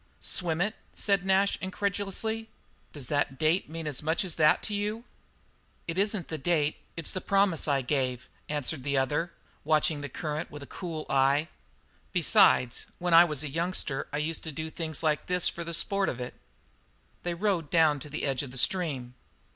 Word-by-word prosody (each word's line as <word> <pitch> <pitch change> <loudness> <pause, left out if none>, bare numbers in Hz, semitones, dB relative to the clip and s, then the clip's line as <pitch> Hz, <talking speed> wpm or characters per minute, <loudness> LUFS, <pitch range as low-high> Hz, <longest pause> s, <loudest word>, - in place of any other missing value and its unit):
"Swim 170 -2 0
it?" 205 +3 0 0.2
said 200 -3 +2
Nash 195 +1 +3
incredulously. 205 +3 -2 0.4
"Does 145 -4 -7
that 145 0 0
date 160 +5 +2
mean 165 0 -5
as 150 -4 -3
much 160 +5 0
as 175 - -1
that 155 -1 +4
to 210 - -3
you?" 210 +3 -2 0.8
"It 165 - -2
isn't 200 -2 0
the 160 - -4
date; 150 0 +1 0.2
it's 165 - 0
the 185 - -3
promise 195 -5 +2
I 140 -2 +2
gave," 130 -2 -1 0.2
answered 150 -1 -1
the 140 0 0
other, 150 +6 0 0.3
watching 155 0 +2
the 145 - -5
current 155 +3 -4
with 145 -1 -9
a - - -8
cool 165 -3 -6
eye, 140 +3 +3 0.6
"besides, 120 -1 +4
when 175 -1 0
I 170 +1 +9
was 150 -3 -2
a - - -3
youngster 165 -1 -1
I 145 - -2
used 155 +2 -2
to 160 - -4
do 160 +2 -5
things 160 -2 -3
like 155 -1 +1
this 180 -1 +2
for 170 - -3
the 170 - -5
sport 195 +4 +2
of 130 - -5
it." 125 0 -5 0.9
They 175 -1 -2
rode 180 -5 0
down 155 -3 +4
to 150 - -9
the 155 - -4
edge 135 -2 0
of 140 - -6
the 130 - -7
stream. 135 -7 0
160 Hz, 185 wpm, -29 LUFS, 145-180 Hz, 0.9 s, I